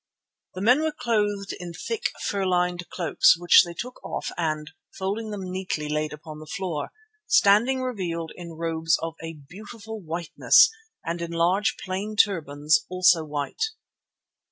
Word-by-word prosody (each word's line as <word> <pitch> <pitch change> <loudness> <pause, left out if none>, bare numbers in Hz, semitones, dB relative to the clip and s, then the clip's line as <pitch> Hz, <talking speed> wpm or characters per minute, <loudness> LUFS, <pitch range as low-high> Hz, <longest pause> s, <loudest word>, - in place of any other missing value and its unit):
The 185 - -5
men 250 +7 +5
were 315 0 0
clothed 205 -6 -1
in 175 -1 -7
thick, 455 - -2 0.2
fur 200 -1 -1
lined 180 -1 0
cloaks, 170 -2 +3
which 175 0 +7
they 170 -1 -8
took 250 +7 -7
off - - -4
and, 155 -2 -2 0.3
folding 205 +4 -3
them 195 -3 -5
neatly, 185 -5 -3
laid 150 0 -1
upon 150 0 -9
the 155 - -11
floor, 185 -7 -3 0.4
standing 235 +6 +4
revealed 175 -10 -3
in 170 -2 -9
robes 165 0 0
of 165 0 -3
a 165 0 -5
beautiful 210 - -10
whiteness 170 - +4 0.3
and 170 +1 -3
in 170 - -4
large 175 +5 +1
plain 195 +3 -4
turbans, 155 -2 +2
also 180 -3 +4
white. 145 -2 -5
180 Hz, 150 wpm, -25 LUFS, 165-205 Hz, 0.4 s, which